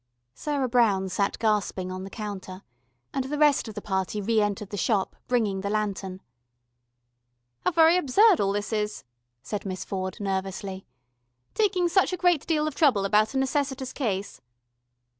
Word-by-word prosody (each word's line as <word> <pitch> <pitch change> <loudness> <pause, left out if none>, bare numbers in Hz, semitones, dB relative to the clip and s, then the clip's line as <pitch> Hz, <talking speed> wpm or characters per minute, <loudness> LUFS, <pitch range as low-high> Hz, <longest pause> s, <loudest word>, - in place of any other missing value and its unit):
Sarah 285 -3 -1
Brown 215 -6 +2
sat 200 +2 0
gasping 205 -4 0
on 185 0 -5
the 195 - -7
counter, 195 -3 -7 0.5
and 270 -1 -1
the 295 +3 -3
rest 295 -4 +3
of 220 - -8
the 210 - -6
party 190 +1 -1
re 220 +2 +2
entered 205 -1 -2
the - - -3
Shop, 200 0 0
bringing 215 -6 +1
the 200 - -3
lantern. 200 -3 -2 1.4
"How - - +1
very 330 0 +5
absurd 370 - +4
all 195 -1 +2
this 205 +2 -3
is," 210 -1 -2 0.4
said 210 -2 -4
Miss 185 -2 -5
Ford 185 -1 -4
nervously, 195 -1 -4 0.7
"taking 385 -5 +2
such 370 +2 +3
a - - -1
great 350 -4 +2
deal 305 -2 +1
of 310 - -3
trouble 260 - +3
about 215 +5 +2
a - - +2
necessitous 265 -1 -1
case." 200 -7 -3
210 Hz, 160 wpm, -26 LUFS, 195-275 Hz, 1.4 s, very